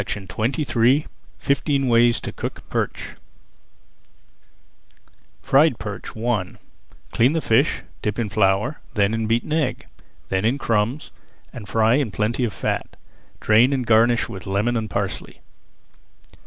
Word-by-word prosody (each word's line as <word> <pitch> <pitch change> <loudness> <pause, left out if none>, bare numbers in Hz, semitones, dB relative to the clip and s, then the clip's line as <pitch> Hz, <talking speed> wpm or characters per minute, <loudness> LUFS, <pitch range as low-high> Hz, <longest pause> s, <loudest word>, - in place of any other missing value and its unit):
[Page 100 - -3
235] 125 - +1 0.3
FIFTEEN 140 -1 0
WAYS 120 0 +4
TO - - -6
COOK - - -6
PERCH - - -2 2.3
FRIED 140 -2 +4
PERCH 105 +1 -7
I 110 -5 -1 0.6
Clean 125 +6 +3
the 165 - +1
fish, 115 -7 +1 0.2
dip 105 -1 -2
in 115 -2 -1
flour, 105 +6 +1 0.2
then 100 0 +2
in 115 -1 -1
beaten 115 +6 0
egg, 155 -5 -1 0.4
then 95 0 0
in 120 +5 +1
crumbs, 115 +2 -1 0.4
and 105 -4 -9
fry 110 +2 +3
in 140 -6 0
plenty 110 +5 -1
of 115 - 0
fat. - - -3 0.5
Drain 115 +5 +4
and 130 -3 -1
garnish 115 +1 +3
with 95 -1 -9
lemon 105 +5 0
and 110 -2 -2
parsley. - - -4
115 Hz, 130 wpm, -22 LUFS, 105-130 Hz, 2.3 s, WAYS